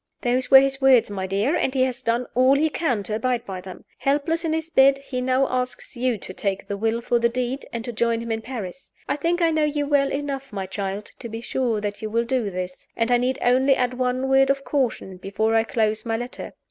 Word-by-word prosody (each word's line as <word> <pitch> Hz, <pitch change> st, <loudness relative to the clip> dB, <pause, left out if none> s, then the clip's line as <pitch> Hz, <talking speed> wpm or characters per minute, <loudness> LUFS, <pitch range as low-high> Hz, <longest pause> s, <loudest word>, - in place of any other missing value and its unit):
Those 250 Hz, +1 st, 0 dB
were 265 Hz, -1 st, +10 dB
his 270 Hz, 0 st, 0 dB
words, 260 Hz, -5 st, +5 dB
my 190 Hz, -2 st, -3 dB
dear; 205 Hz, -, +1 dB
and 265 Hz, -, 0 dB
he 260 Hz, -, +3 dB
has 260 Hz, 0 st, -2 dB
done 235 Hz, +1 st, 0 dB
all 255 Hz, +2 st, +5 dB
he 310 Hz, +2 st, +2 dB
can 250 Hz, -12 st, -1 dB
to 210 Hz, -, -3 dB
abide 235 Hz, +2 st, -1 dB
by 190 Hz, -2 st, -6 dB
them. 185 Hz, 0 st, -11 dB
Helpless 295 Hz, +4 st, 0 dB
in 325 Hz, -, -1 dB
his 320 Hz, +1 st, -2 dB
bed, 275 Hz, -3 st, +5 dB
he 275 Hz, -2 st, -5 dB
now 260 Hz, +1 st, +2 dB
asks 255 Hz, +1 st, -3 dB
you 245 Hz, -1 st, 0 dB
to 185 Hz, -, -8 dB
take 195 Hz, 0 st, -3 dB
the 200 Hz, -, -3 dB
will 225 Hz, +3 st, -1 dB
for 240 Hz, 0 st, +1 dB
the 235 Hz, 0 st, +3 dB
deed, 250 Hz, +3 st, -3 dB
and 235 Hz, -1 st, -4 dB
to 240 Hz, -, -4 dB
join 230 Hz, 0 st, +1 dB
him 230 Hz, 0 st, -5 dB
in 225 Hz, 0 st, -1 dB
Paris. 235 Hz, 0 st, -7 dB, 0.2 s
I -, -, 0 dB
think 335 Hz, +4 st, 0 dB
I 330 Hz, -, +4 dB
know 315 Hz, -1 st, +1 dB
you 295 Hz, -1 st, 0 dB
well 285 Hz, -1 st, +2 dB
enough, 275 Hz, -1 st, -4 dB
my 195 Hz, -2 st, -4 dB
child, 195 Hz, +1 st, -4 dB
to 235 Hz, -, -7 dB
be 225 Hz, +1 st, -5 dB
sure 235 Hz, -2 st, -1 dB
that 205 Hz, -1 st, -4 dB
you 215 Hz, -, -3 dB
will 230 Hz, +2 st, 0 dB
do 240 Hz, -4 st, 0 dB
this; 180 Hz, -1 st, -6 dB
and 230 Hz, +1 st, +1 dB
I 245 Hz, -, +5 dB
need 255 Hz, +2 st, 0 dB
only 260 Hz, +2 st, +4 dB
add 250 Hz, -1 st, 0 dB
one 255 Hz, +1 st, -1 dB
word 270 Hz, 0 st, +4 dB
of 275 Hz, 0 st, +1 dB
caution, 240 Hz, -9 st, -1 dB
before 200 Hz, +4 st, -1 dB
I 225 Hz, 0 st, +4 dB
close 220 Hz, -1 st, 0 dB
my 225 Hz, -1 st, -1 dB
letter. 245 Hz, +2 st, -7 dB
250 Hz, 250 wpm, -23 LUFS, 220-270 Hz, 0.2 s, were